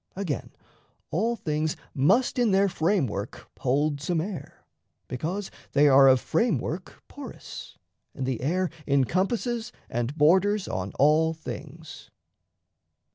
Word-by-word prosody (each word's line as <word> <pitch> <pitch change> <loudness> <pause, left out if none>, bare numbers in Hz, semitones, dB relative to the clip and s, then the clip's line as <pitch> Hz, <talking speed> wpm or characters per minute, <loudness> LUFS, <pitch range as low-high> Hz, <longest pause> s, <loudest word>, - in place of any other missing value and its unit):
Again, 180 -9 -3 0.6
all 225 +8 +1
things 155 -5 -2 0.2
Must 230 - +3
in 240 -2 +3
their 195 0 +4
framework 155 - -1
hold 140 +2 +1
some 165 +3 0
air, 180 +2 -6 0.4
because 175 +10 -4 0.2
They 145 +1 +5
are 135 -1 +7
of 130 -1 +6
framework 190 - -1
porous, 285 -1 -9 0.4
and 135 - -3
the 130 -3 -2
air 180 +6 0 0.2
Encompasses 195 - 0 0.2
and 120 +5 -2
borders 190 +7 +4
on 95 +1 -3
all 155 +3 +4
things. 160 0 -9
160 Hz, 115 wpm, -26 LUFS, 140-195 Hz, 0.6 s, are